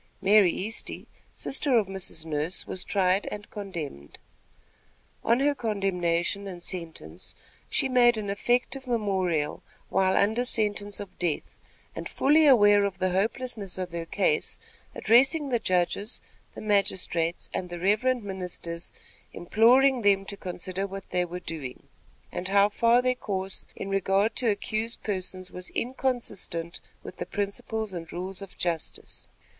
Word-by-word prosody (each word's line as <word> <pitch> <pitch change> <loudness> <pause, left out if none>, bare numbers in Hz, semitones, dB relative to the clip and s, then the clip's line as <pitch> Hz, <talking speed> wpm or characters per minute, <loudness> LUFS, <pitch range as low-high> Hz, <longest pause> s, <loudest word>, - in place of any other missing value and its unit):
Mary 195 -2 +6
Easty, 220 +4 -4 0.3
sister 270 -2 +1
of 220 - +3
Mrs. 190 -4 -4
Nurse, 155 +3 -1
was 185 - -1
tried 190 0 +1
and 205 0 -7
condemned. 165 - -6 1.1
On 235 +2 +3
her 290 +1 +3
condemnation 195 -5 0
and 175 -2 -8
sentence, 165 - -6 0.3
she - - +2
made 240 -2 +5
an 210 -2 -3
affective 245 +6 0
memorial 190 -10 0 0.3
while 190 0 +3
under 220 +4 +3
sentence 205 -4 -1
of 205 -2 -9
death, 170 -4 -2 0.4
and - - -5
fully 305 +2 +4
aware 205 -6 +7
of 200 -1 -1
the 185 0 0
hopelessness 205 0 -1
of 185 -2 -4
her 165 -1 -4
case, 455 - +1 0.4
addressing 275 +5 +4
the 240 -2 +2
judges, 185 +3 0 0.4
the - - -7
magistrates 185 -5 +1
and 180 - -3
the 175 - -5
reverend 215 +7 +2
ministers, 180 -3 -5 0.4
imploring 245 +7 +4
them 200 -2 +3
to 200 - -4
consider 185 0 -4
what 195 0 -8
they 180 0 +1
were 175 +1 -6
doing, 150 -7 -6 0.5
and 185 - -3
how 200 +1 +5
far 235 +3 +4
their 255 0 +3
course 195 -5 -4
in - - -5
regard 195 +3 +2
to 240 - +2
accused 215 +3 -2
persons 185 -2 -3
was 180 0 -7
inconsistent 235 -9 -2 0.2
with - - -9
the - - -3
principles 205 +1 -3
and 165 -2 -6
rules 185 +2 -5
of 195 -1 -10
justice. 170 -3 -3
195 Hz, 140 wpm, -27 LUFS, 180-225 Hz, 1.1 s, aware